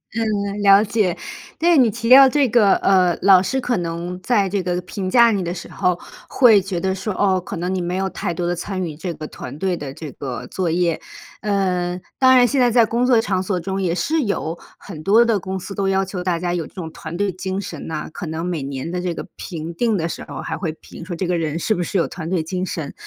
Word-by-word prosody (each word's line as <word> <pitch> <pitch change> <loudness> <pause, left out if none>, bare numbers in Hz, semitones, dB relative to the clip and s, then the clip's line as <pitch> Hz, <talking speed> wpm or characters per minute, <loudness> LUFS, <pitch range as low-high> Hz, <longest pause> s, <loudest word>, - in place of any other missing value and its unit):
嗯， 205 -2 -1
了 200 0 +6
解。 205 -4 0 0.4
但 345 +2 +3
是 335 - +5
你 250 -4 +5
提 230 +2 -4
到 265 +1 +9
这 280 0 +2
个 210 -4 +5
呃， 185 -3 +3
老 190 -2 +7
师 230 +8 -1
可 245 -2 0
能 175 +1 -4
在 205 -1 +2
这 200 +1 -1
个 180 0 -1
评 185 +1 -5
价 235 +2 +6
你 200 -3 0
的 170 0 -3
时 175 - -8
候， 180 -1 0 0.3
会 225 -6 +6
觉 190 -2 -3
得 190 +1 0
说： 190 +3 -4
“哦， 190 -2 +2
可 175 - -6
能 180 +2 -2
你 185 - -1
没 175 +1 -2
有 190 0 0
太 - - -3
多 175 +1 -3
地 175 - 0
参 185 +2 -4
与 155 -3 -6
这 175 +3 -4
个 155 +1 -7
团 145 - -9
队 190 0 0
的 140 -4 -6
这 150 0 -8
个 130 -3 -6
作 185 -3 -2
业。” 170 -1 0 0.4
呃， 185 -3 0 0.2
当 260 0 +6
然 245 -1 +6
现 270 +1 +1
在 245 - +5
在 230 0 +5
工 235 +3 0
作 245 -3 +5
场 190 -5 -1
所 185 -1 -1
中 190 +3 -3
也 175 -2 0
是 310 - 0
有 170 -6 -2 0.2
很 165 -6 -10
多 220 +6 +5
的 225 -3 +2
公 190 +1 -4
司 190 +2 -7
都 195 -1 -1
要 195 0 +1
求 185 -1 -5
大 180 -2 0
家 175 0 -1
有 170 -3 -2
这 - - -22
种 165 -4 -6
团 165 +1 -7
队 200 0 0
精 190 +1 -4
神 165 -6 -7
呐， 155 -1 -4
可 175 - -6
能 160 +2 -4
每 175 -4 -2
年 135 +3 -5
的 180 0 -2
这 180 -1 -2
个 - - -6
评 165 -2 -6
定 220 +4 +1
的 165 -2 -1
时 - - -6
候 - - -6
还 160 - -4
会 165 -1 -2
评 160 - -12
说 175 0 -5
这 185 - -2
个 180 -1 +1
人 160 -1 -2
是 215 +5 0
不 175 - -1
是 195 - -2
有 170 - +2
团 165 -2 -7
队 175 -3 0
精 180 +3 -3
神。 160 -5 -5
185 Hz, 280 characters per minute, -20 LUFS, 170-205 Hz, 0.4 s, 到